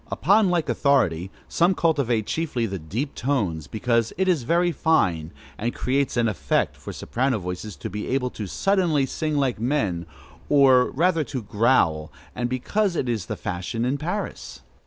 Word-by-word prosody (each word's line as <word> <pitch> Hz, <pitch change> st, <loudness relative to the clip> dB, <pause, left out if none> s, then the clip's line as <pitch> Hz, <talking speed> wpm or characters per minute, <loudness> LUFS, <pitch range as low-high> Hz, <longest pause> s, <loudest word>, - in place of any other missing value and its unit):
Upon 200 Hz, 0 st, +3 dB
like 175 Hz, -3 st, +1 dB
authority, 95 Hz, -, +2 dB, 0.2 s
some 175 Hz, +2 st, +2 dB
cultivate 135 Hz, -11 st, +1 dB
chiefly 145 Hz, -6 st, -1 dB
the 95 Hz, -3 st, -4 dB
deep 110 Hz, -, -4 dB
tones, 100 Hz, -, -1 dB
because 115 Hz, -, 0 dB
it 190 Hz, +1 st, +1 dB
is 175 Hz, -6 st, +2 dB
very 170 Hz, +7 st, +2 dB
fine, 90 Hz, -, +1 dB, 0.3 s
and 120 Hz, +3 st, -2 dB
"creates 135 Hz, 0 st, 0 dB
an 120 Hz, -1 st, +3 dB
effect," 75 Hz, -10 st, 0 dB
for -, -, -8 dB
soprano 130 Hz, 0 st, -1 dB
voices 90 Hz, +2 st, -6 dB
to -, -, -6 dB
be 105 Hz, +2 st, -5 dB
able 125 Hz, -1 st, -1 dB
suddenly 160 Hz, -, +1 dB
to -, -, -9 dB
sing 155 Hz, -2 st, -1 dB
like 135 Hz, -6 st, 0 dB
men, 105 Hz, -, -1 dB, 0.4 s
or 130 Hz, -3 st, +5 dB
rather 165 Hz, +2 st, +1 dB
to 130 Hz, -3 st, -5 dB
growl, 100 Hz, -9 st, +2 dB, 0.2 s
and 120 Hz, 0 st, -2 dB
because 185 Hz, -, 0 dB
it 130 Hz, -, -1 dB
is 115 Hz, -7 st, -2 dB
the -, -, -4 dB
fashion 100 Hz, +4 st, -3 dB
in 135 Hz, +3 st, -1 dB
Paris. 180 Hz, +7 st, -5 dB
125 Hz, 165 wpm, -24 LUFS, 105-155 Hz, 0.4 s, or